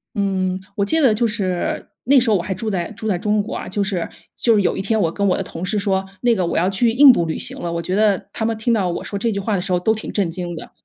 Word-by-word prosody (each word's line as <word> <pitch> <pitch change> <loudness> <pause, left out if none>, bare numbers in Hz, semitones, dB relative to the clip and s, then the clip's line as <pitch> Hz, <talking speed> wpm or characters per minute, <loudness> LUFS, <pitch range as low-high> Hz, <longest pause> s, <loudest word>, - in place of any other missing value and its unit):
嗯， 190 -2 0
嗯， 190 - -7 0.2
我 200 - +2
记 320 +9 +2
得 250 -6 +5
就 230 +2 +1
是 190 -5 -2 0.2
那 275 +2 +5
时 240 -2 +3
候 205 - +4
我 - - -2
还 190 +2 -3
住 215 +4 -4
在 175 -1 -2
住 220 +1 -5
在 180 - +1
中 210 +2 0
国 - - -6
啊， - - -5
就 205 - -1
是 190 -4 -2 0.3
就 230 -2 +3
是 205 - +3
有 - - 0
一 - - -1
天 220 +2 0
我 165 -2 +1
跟 200 +1 0
我 180 - +3
的 195 - -2
同 175 0 -6
事 210 +3 -1
说： 195 -1 0 0.2
“那 240 -1 +4
个， 185 -5 0
我 - - -1
要 180 +3 +2
去 225 +4 +2
印 270 +2 +8
度 170 -8 +1
旅 160 - -3
行 - - -4
了。” 170 - -3
我 170 - -2
觉 180 +3 -4
得 205 -1 +1
他 220 - -3
们 225 -1 -1
听 235 +2 +1
到 190 -5 +1
我 170 - -4
说 200 - -5
这 230 0 0
句 200 - -2
话 205 -1 -1
的 - - -2
时 185 -1 -2
候 175 - +2
都 220 +5 +2
挺 220 - -6
震 190 -5 0
惊 175 -1 -4
的， - - -9
200 Hz, 350 characters per minute, -20 LUFS, 185-220 Hz, 0.3 s, 印